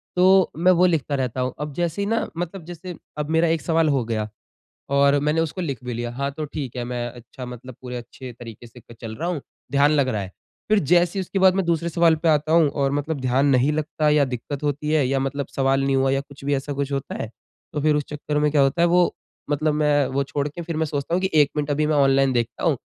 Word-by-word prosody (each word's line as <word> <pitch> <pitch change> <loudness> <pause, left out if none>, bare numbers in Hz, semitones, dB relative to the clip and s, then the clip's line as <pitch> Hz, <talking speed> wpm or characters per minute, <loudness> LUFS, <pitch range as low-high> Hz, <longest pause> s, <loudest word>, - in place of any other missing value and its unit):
तो 185 +1 +5
मैं 180 +3 +4
वो 180 - +6
लिखता 155 -5 +1
रहता 130 -2 -2
हूँ। 125 0 -1
अब 150 -1 -4
जैसे 175 +4 -2
ही - - 0
न 230 - +1
मतलब 175 +1 -4
जैसे 175 +1 -8 0.2
अब 150 0 -3
मेरा 160 +1 +3
एक 165 -1 +1
सवाल 165 -2 +2
हो 135 -4 +1
गया 110 -2 -2 0.7
और 140 0 +5
मैंने 150 +3 +1
उसको 165 +3 -3
लिख 140 -7 -4
भी 125 -1 -4
लिया। 120 +1 -3
हाँ, 140 +3 -3
तो 155 +2 -5
ठीक 140 -4 -6
है 120 - -2
मैं 120 0 -3
अच्छा 125 +2 -10
मतलब 125 0 -9
पूरे 125 -1 -5
अच्छे 125 +2 -9
तरीके 115 0 -11
से 120 +2 -15
क 120 - -15
चल 110 -2 -6
रहा 165 +7 -3
हूँ, 170 -6 -2 0.3
ध्यान 140 +1 +4
लग 140 -3 +2
रहा 110 -5 -1
है। 95 -1 -7 0.4
फिर 215 -1 +5
जैसे 175 +3 +2
ही - - +1
उसके 190 +1 -3
बाद 190 -1 +5
मैं 195 -2 0
दूसरे 170 0 0
सवाल 170 -1 +4
पे 165 +1 0
आता 155 0 +2
हूँ 165 -2 +5
और 140 -1 0
मतलब 145 +1 -2
ध्यान 130 +2 +2
नहीं 135 0 +3
लगता 155 0 0
या 150 -1 +4
दिक्कत 130 +3 -5
होती 150 +1 -1
है 155 -3 +3
या 135 +1 +1
मतलब 135 +1 -2
सवाल 135 0 +2
नहीं 135 0 +1
हुआ 135 0 +2
या 135 - +1
कुछ 140 0 -15
भी 145 0 +2
ऐसा 140 +2 -3
कुछ 140 0 -3
होता 135 -1 -3
है 110 - -5 0.4
तो 150 - -2
फिर 150 0 +3
उस 150 - 0
चक्कर 150 0 -3
में 150 0 +3
क्या 145 -1 +4
होता 135 +5 +2
है 170 - +5
वो 175 0 +3 0.4
मतलब 150 +1 +1
मैं 150 -1 +2
वो 140 +1 0
छोड़ 140 +1 -2
के 150 +4 -7
फिर 165 -1 -4
मैं 160 - +1
सोचता 145 +1 -3
हूँ 180 - +2
कि 190 - 0
1 150 -2 +5
मिनट 150 0 -1
अभी 150 +1 +1
मैं 155 - +1
ऑनलाइन 135 -1 +4
देखता 120 -2 -2
हूँ - - +2
145 Hz, 265 wpm, -23 LUFS, 135-160 Hz, 0.7 s, वो